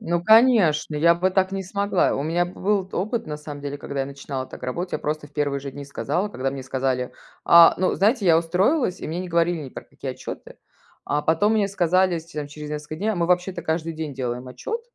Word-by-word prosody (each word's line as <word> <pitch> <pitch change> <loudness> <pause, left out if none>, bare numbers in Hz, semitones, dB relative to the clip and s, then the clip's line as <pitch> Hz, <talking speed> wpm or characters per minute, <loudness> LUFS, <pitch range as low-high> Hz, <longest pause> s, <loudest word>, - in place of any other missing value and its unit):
Ну, 175 -5 -1
конечно, 220 -10 +5
я 170 +3 +5
бы 185 +2 +1
так 190 0 +1
не 195 0 -2
смогла. 200 +2 +1
У 140 - -2
меня 170 +3 0
б 180 - -9
был 200 -1 +1
т - - -7
опыт, 215 +6 -2
на 150 -1 -4
самом 150 -1 -8
деле, 145 0 -5
когда 140 -1 -4
я 135 - -1
начинала 135 -1 -6
так - - -12
работать, 170 +9 -4
я - - 0
просто 150 0 -3
в 145 - -24
1 145 -2 -1
же 140 0 -6
дни 140 +1 -8
сказала, 150 +7 -2
когда 135 -8 -3
мне 135 -1 -6
сказали 130 -1 -2 0.3
А, 170 0 +8
ну, 185 - +1
знаете, 210 +2 +2
я 165 -2 +6
устроилась, 185 - +1
и - - -5
мне 165 +3 -3
не 185 - -6
говорили 170 0 +1
ни 135 - -7
про - - -9
какие - - -7
отчеты. - - -9 0.5
А 150 - 0
потом 165 +8 +2
мне 205 -2 +2
сказали, 185 -1 +2
с 160 - -11
т 160 -2 -9
там 145 -1 -4
через 150 0 -8
несколько 150 +1 -5
дней: 205 +6 -2
"А - - -1
мы 170 -1 +1
вообще-то 180 +1 0
каждый 160 +1 -2
день 155 -3 -5
делаем 125 -1 -4
отчет". 285 - -5
165 Hz, 245 wpm, -23 LUFS, 145-185 Hz, 0.5 s, А